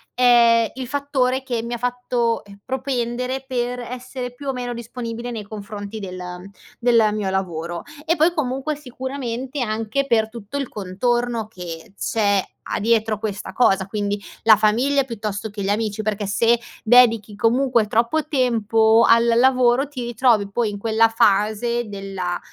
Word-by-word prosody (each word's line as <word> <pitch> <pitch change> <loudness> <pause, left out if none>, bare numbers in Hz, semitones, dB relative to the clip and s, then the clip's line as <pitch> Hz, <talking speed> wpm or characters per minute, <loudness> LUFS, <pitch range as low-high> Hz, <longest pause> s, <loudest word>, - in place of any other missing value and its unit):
è 235 -2 +5
il 255 -1 -6
fattore 265 -2 0
che 240 -4 -2
mi 235 +1 -5
ha - - -4
fatto, 245 -1 -1
ehm, 200 -1 -15
propendere 255 0 -2
per 245 -1 -2
essere 250 +1 -6
più 280 +3 -10
o - - +1
meno 245 -1 -4
disponibile 235 0 -6
nei 225 -3 -5
confronti 205 0 -7
del, 185 -2 -7
ehm, 180 +1 -8 0.3
del 230 -3 +4
mio 210 -2 -2
lavoro. 175 -3 -3 0.2
E 330 +1 +2
poi 335 +2 +3
comunque, 270 0 -2
sicuramente 260 -1 -5
anche 225 +4 -1
per 220 -3 +3
tutto 230 +3 -7
il 275 - -2
contorno 230 +4 -1
che 175 -4 -9
c'è 200 -3 +1 0.3
a - - 0
dietro 220 0 +1
questa 205 -3 -5
cosa, 195 -5 +3
quindi: 205 0 -2 0.2
la 220 -2 +7
famiglia 245 +7 +2
piuttosto 220 -4 -5
che 205 -1 -6
gli 195 - -1
amici 210 0 -1
perché, 210 -1 -2
se 230 +4 +3 0.2
dedichi 230 -3 +5
comunque 235 0 +2
troppo 235 +9 +1
tempo 225 -4 +3
al 230 - +7
lavoro 250 +2 +3
ti 255 -4 -6
ritrovi 230 -4 +2
poi 230 +1 0
in 205 - -5
quella 225 +2 +3
fase 220 +2 +1
della 195 -3 -4
230 Hz, 155 wpm, -21 LUFS, 210-250 Hz, 0.3 s, la